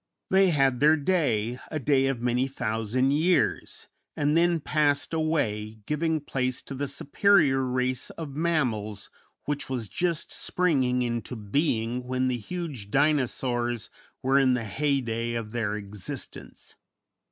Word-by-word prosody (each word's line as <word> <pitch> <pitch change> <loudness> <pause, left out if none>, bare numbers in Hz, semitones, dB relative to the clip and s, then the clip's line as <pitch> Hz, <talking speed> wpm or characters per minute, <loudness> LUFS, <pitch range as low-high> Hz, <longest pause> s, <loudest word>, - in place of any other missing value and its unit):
They 190 0 +5
had 135 -6 +2
their 150 +2 +6
day, 130 - 0
a 155 - -3
day 135 -1 +2
of 135 -3 -2
many 125 +2 +1
thousand 115 +1 0
years, 165 +5 +1 0.3
and 150 +1 +2
then 170 0 +3
passed 145 0 +1
away, 110 -10 -1
giving 155 +2 0
place 130 -3 -2
to - - -8
the 140 +1 -3
superior 140 0 +3
race 130 0 -1
of 150 -4 -7
mammals 120 -11 -1 0.3
which 145 -2 -3
was 125 -5 -3
just 170 - -2
springing 130 -8 +1
into 120 +1 -3
being 115 +1 -1
when 130 0 0
the 125 - 0
huge 140 - -6
Dinosaurs 120 - 0 0.3
were 135 +1 +4
in 130 -2 +4
the 115 -2 -3
heyday 120 -1 -1
of 115 -2 -4
their 110 -3 -1
existence. 105 -1 -8
130 Hz, 135 wpm, -27 LUFS, 120-150 Hz, 0.3 s, their